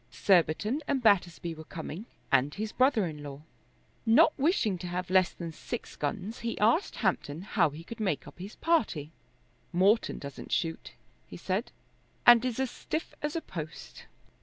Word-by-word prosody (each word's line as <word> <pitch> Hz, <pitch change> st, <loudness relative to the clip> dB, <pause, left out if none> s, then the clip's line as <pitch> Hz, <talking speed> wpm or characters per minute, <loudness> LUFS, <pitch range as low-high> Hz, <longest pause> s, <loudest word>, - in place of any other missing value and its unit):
Surbiton 200 Hz, -, +2 dB
and 270 Hz, -3 st, 0 dB
Battersby 175 Hz, -5 st, +2 dB
were 160 Hz, 0 st, -10 dB
coming, 170 Hz, +5 st, -7 dB, 0.2 s
and 135 Hz, +2 st, +3 dB
his 215 Hz, +1 st, -3 dB
brother 255 Hz, -6 st, +3 dB
in 155 Hz, -3 st, -6 dB
law. 145 Hz, 0 st, -8 dB, 0.6 s
Not 260 Hz, +8 st, +6 dB
wishing 265 Hz, -, +1 dB
to 180 Hz, -, -5 dB
have 180 Hz, +1 st, -4 dB
less 185 Hz, -1 st, +5 dB
than 170 Hz, -2 st, -7 dB
six 230 Hz, +8 st, -6 dB
guns 215 Hz, +2 st, -3 dB
he 235 Hz, 0 st, -3 dB
asked 230 Hz, -, +2 dB
Hampton 150 Hz, +5 st, -1 dB
how 190 Hz, -5 st, +2 dB
he 150 Hz, +3 st, -10 dB
could 230 Hz, +6 st, -9 dB
make 170 Hz, -11 st, -1 dB
up -, -, -13 dB
his 195 Hz, +4 st, -8 dB
party. 210 Hz, -, 0 dB, 0.6 s
"Morton 195 Hz, +6 st, +3 dB
doesn't 140 Hz, -1 st, -8 dB
shoot," 165 Hz, -1 st, -2 dB, 0.3 s
he 85 Hz, -, -9 dB
said, 190 Hz, -, -2 dB, 0.5 s
"and 240 Hz, -1 st, +8 dB
is 255 Hz, -1 st, -2 dB
as 265 Hz, -2 st, 0 dB
stiff 315 Hz, -, -4 dB
as 295 Hz, +1 st, -2 dB
a 330 Hz, -, -1 dB
post." 155 Hz, -, -8 dB
190 Hz, 165 wpm, -29 LUFS, 165-235 Hz, 0.6 s, and